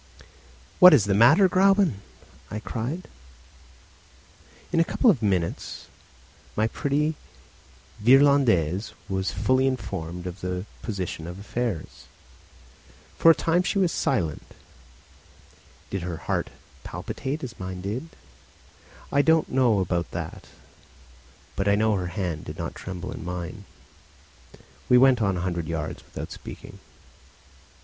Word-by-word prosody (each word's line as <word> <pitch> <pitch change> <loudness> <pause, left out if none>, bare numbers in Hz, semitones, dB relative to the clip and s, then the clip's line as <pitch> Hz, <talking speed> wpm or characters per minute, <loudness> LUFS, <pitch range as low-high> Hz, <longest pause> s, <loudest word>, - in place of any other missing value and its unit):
"What 180 -3 +10
is 110 -8 +3
the 100 - +1
matter, 145 - +6
Gräuben?" 190 - +3 0.5
I 105 - -4
cried. 125 +11 -4 1.7
In 165 - +3
a - - +6
couple 235 +7 +3
of 140 - -2
minutes 95 -5 -2 0.7
my 110 - +2
pretty 145 +6 0 0.9
Virlandaise 120 - +4
was 95 0 -1
fully 130 +1 +2
informed 90 -8 -4
of 90 +1 -7
the 90 +1 -3 0.2
position 90 -6 -4
of 90 +1 -7
affairs. 105 -3 -4 1.1
For 165 - +7
a 165 - +8
time 165 +2 +2
she 185 +3 -1
was 185 -4 +2
silent. 85 - -2 1.4
Did 95 - -2
her 85 -1 -4
heart 85 - -2 0.3
palpitate 130 - -5
as 120 -3 -7
mine 95 0 -6
did? 110 - -4 1.0
I 140 - +4
don't 160 +1 +3
know 120 -6 +3
about 90 -1 -1
that, - - -7 1.1
but 95 - -1
I 100 - +4
know 110 +1 +2
that 105 - +1
her 90 - -3
hand 90 -3 -4
did - - -8
not - - -4
tremble 90 -2 -7
in - - -7
mine. 90 +3 -6 1.2
We 125 - +7
went 130 -2 +5
on 100 -3 +1
a - - -3
hundred 85 -3 -2
yards 80 -2 -4
without - - -8
speaking. - - -10
105 Hz, 130 wpm, -25 LUFS, 90-140 Hz, 1.7 s, What